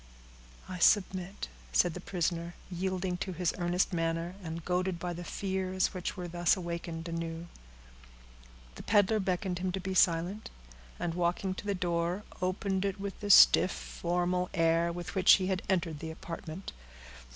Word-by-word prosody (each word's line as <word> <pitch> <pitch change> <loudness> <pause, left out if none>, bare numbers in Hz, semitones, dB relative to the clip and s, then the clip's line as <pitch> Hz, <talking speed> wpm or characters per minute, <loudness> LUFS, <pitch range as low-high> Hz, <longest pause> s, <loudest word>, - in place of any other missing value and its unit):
"I 185 -1 -6
submit," 185 0 +2 0.2
said 160 - +3
the 180 - -7
prisoner, 170 -2 -2 0.2
yielding 185 0 -2
to 185 +1 -4
his 175 0 0
earnest 175 +2 +1
manner, 165 +1 -1
and 165 -1 -6
goaded 180 0 0
by 175 +1 -4
the 175 +1 -6
fears 190 0 -1
that 185 -1 -5
were 180 -1 -4
thus 175 +1 +2
awakened 170 -1 -5
anew. 165 0 -4 1.3
The - - -9
peddler 210 0 +3
beckoned 185 -1 -1
him 185 0 -1
to 190 - -1
be 190 +1 -3
silent, 180 +3 +2 0.5
and 170 - -2
walking 175 +2 0
to 185 - -8
the 200 - +1
door, 175 +2 -1 0.2
opened 190 +1 0
it, 200 0 -2
with 200 0 -5
the 205 - -5
stiff, 190 - +8
formal 180 +1 -1
air 165 0 +3
with 175 0 -6
which 190 -1 +7
he 190 - +3
had 185 -1 0
entered 170 -5 0
the 160 - -5
apartment. 165 +2 -7
180 Hz, 160 wpm, -31 LUFS, 170-190 Hz, 1.3 s, stiff